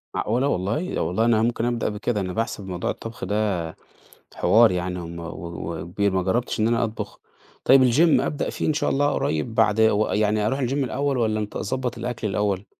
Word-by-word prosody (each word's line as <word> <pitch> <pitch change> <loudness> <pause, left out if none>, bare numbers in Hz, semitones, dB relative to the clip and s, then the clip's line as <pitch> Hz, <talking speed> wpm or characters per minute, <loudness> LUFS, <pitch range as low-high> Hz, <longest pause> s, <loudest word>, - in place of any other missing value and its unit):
معقولة 125 +6 0
والله! 115 - -1
والله 90 +8 +1
أنا 115 -2 +3
ممكن 115 0 0
أبدأ 120 -2 0
بكده، 105 0 -2
أنا 90 -1 -3
باحسب 110 -3 -3
موضوع 90 -2 -3
الطبخ 115 -3 -6
ده 105 0 0 0.8
حوار 115 -1 +5
يعني، 90 0 -2
هُم 85 0 -7
و 85 0 -6 0.5
وكبير، 95 +4 -1
ما 95 -1 0
جربتش 115 +4 -1
إن 110 - +3
أنا 115 0 +2
أطبخ. 110 -1 -5 0.5
طيب 130 -2 +6
الGym 160 +5 +4
أبدأ 145 - -2
فيه - - -3
إن 155 - +2
شاء 145 0 0
الله 145 +1 +2
قريب 80 +9 -1
بعد 110 -1 +3
ويعني 105 -1 +2
أروح 135 +4 -1
الGym 125 -1 -1
الأول 140 0 0
والّا 110 -2 +1
أنتظ 105 +1 -4
أضبط 125 -2 -2
الأكل 115 -1 -3
الأول؟ 100 -1 -1
110 Hz, 190 wpm, -24 LUFS, 100-120 Hz, 0.8 s, طيب